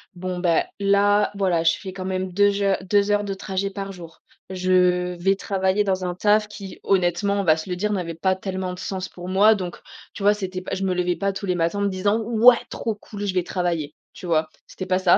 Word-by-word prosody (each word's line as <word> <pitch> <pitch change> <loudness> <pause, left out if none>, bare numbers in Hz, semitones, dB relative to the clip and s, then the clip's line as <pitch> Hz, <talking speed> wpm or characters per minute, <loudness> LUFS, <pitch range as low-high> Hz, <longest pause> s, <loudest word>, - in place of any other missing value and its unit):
bon, 180 0 -4
bah, 170 -3 +2
là, 205 +1 +3
voilà, 185 -4 +1
je 165 0 +3
fais 190 - -7
quand 185 -1 -6
même 185 0 -2
2 205 +2 +4
heures, 200 -1 +1
2 205 +2 +2
heures 205 0 +2
de 200 -1 -3
trajet 195 0 -3
par 195 0 -5
jour. 170 -3 -12 0.3
Je 180 -1 +2
vais 195 +2 +3
travailler 195 +1 0
dans 190 -2 -1
un 175 0 -3
taf 210 +2 +3
qui 200 -2 -10
honnêtement, 195 +2 +1
on - - -3
va 155 -3 +4
se 160 +4 -7
le 180 - -1
dire, 210 +4 -1
n'avait 175 -4 -3
pas 185 +3 +1
tellement 190 -1 -4
de 180 - -9
sens 190 -1 -4
pour 180 0 -9
moi, 200 +4 +5
donc, 180 -3 -5 0.4
tu 200 - -7
vois, 205 +1 +5
c'était 190 -3 -5
pas - - -6
je 195 - -4
me 185 -1 +1
levais 180 -1 0
pas 200 0 -1
tous 200 - -5
les 180 -2 0
matins 170 +4 0
en - - -1
me 200 - +1
disant: 205 +3 0
«Ouais 235 +1 +6
trop 225 -2 -3
cool 205 0 -7
je 195 - -1
vais 180 - +2
travailler», 170 -5 -2 0.2
tu - - -10
vois? 160 -2 +1 0.2
C'était 185 - -7
pas 185 - +2
ça. 185 -2 +5
190 Hz, 245 wpm, -23 LUFS, 180-200 Hz, 0.4 s, Ouais